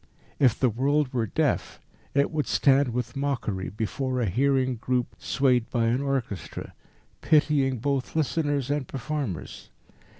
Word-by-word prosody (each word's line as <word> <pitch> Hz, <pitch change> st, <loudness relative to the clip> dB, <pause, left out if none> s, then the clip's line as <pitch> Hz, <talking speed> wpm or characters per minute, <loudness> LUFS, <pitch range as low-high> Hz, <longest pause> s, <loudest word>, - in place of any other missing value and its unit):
If 130 Hz, -5 st, +4 dB
the 130 Hz, -3 st, +3 dB
world 140 Hz, +4 st, +1 dB
were 115 Hz, -3 st, 0 dB
deaf -, -, -1 dB, 0.4 s
it 140 Hz, 0 st, +3 dB
would 155 Hz, -2 st, -1 dB
stand 140 Hz, 0 st, +4 dB
with 125 Hz, +3 st, -3 dB
mockery 130 Hz, -9 st, -2 dB
before 125 Hz, +5 st, -2 dB
a 120 Hz, -, +1 dB
hearing 130 Hz, +4 st, +1 dB
group 125 Hz, +1 st, -1 dB
swayed 125 Hz, -3 st, +1 dB
by 120 Hz, -2 st, +1 dB
an 120 Hz, +4 st, +1 dB
orchestra, 135 Hz, -, -3 dB, 0.5 s
pitying 145 Hz, -4 st, +3 dB
both 135 Hz, +4 st, -2 dB
listeners 145 Hz, -3 st, 0 dB
and 145 Hz, -3 st, -1 dB
performers. 135 Hz, -, -5 dB
130 Hz, 135 wpm, -26 LUFS, 120-140 Hz, 0.5 s, If